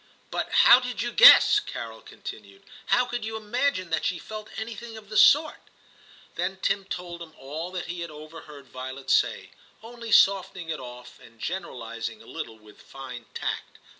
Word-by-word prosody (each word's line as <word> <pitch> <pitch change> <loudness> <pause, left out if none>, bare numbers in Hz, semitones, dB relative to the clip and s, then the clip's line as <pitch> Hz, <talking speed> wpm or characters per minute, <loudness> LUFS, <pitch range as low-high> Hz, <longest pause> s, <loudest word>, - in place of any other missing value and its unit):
' - - -35
But - - -3
how 245 - +8
did 250 -4 -4
you 240 - -3
guess,' 480 - +8
Carol 115 - -7
continued, 100 -2 -11 0.2
*how 250 - +3
could 240 -2 -4
you 220 0 -4
imagine 215 -4 -1
that 160 - 0
she 180 - 0
felt 215 +3 -9
any 220 +1 -4
thing 225 +1 -9
of 210 -2 -13
the 215 - -7
sort?' 300 +7 +4 0.6
Then 190 - -3
Tim 195 0 0
told 175 -2 -6
him 160 -2 -11
all 155 +6 -6
that 180 - -4
he 175 0 -6
had 170 0 -5
over 155 +2 -11
heard 140 -2 -12
Violet 130 +1 -6
say, - - +1 0.3
only 230 0 -9
softening 190 -4 +3
it 155 -2 -3
off, 125 -1 -11
and 115 -1 -18
generalising - - -5
a - - -16
little 110 - -7
with 105 -1 -18
fine 125 -3 -10
tact. - - -4
175 Hz, 185 wpm, -26 LUFS, 135-220 Hz, 0.6 s, how